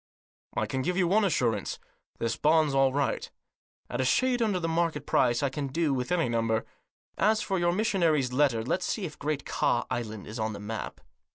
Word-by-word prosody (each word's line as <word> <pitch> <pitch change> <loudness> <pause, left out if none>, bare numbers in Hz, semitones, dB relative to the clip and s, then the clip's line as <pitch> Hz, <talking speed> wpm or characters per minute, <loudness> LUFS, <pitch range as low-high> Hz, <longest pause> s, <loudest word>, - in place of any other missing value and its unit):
"I - - +1
can 130 - -2
give 180 +6 -1
you 180 -2 +3
one 210 +5 +3
assurance 120 - 0 0.2
— - - -45
this 115 0 -1
bond's 155 -1 +3
all 135 -1 +4
right. 140 +1 -1 0.6
At - - -2
a - - +2
shade 245 - +2
under 210 -5 +1
the 165 - -2
market 165 -3 0
price, 120 +1 +2
I 140 - +2
can 140 +1 -3
do 150 +1 0
with 125 +2 -2
any 175 -5 +2
number. 115 -1 0 0.5
As 215 +3 +3
for 190 -2 -1
your 175 0 +2
missionary's 170 - +1
letter, 130 -5 +2
let's 130 - -1
see 210 - -2
if 155 - -8
Great 150 -1 -2
Ka - - +1
Island 110 -4 -4
is 110 +2 -7
on 110 0 -1
the 100 - -7
map." 110 +2 -6
145 Hz, 205 wpm, -28 LUFS, 120-175 Hz, 0.6 s, all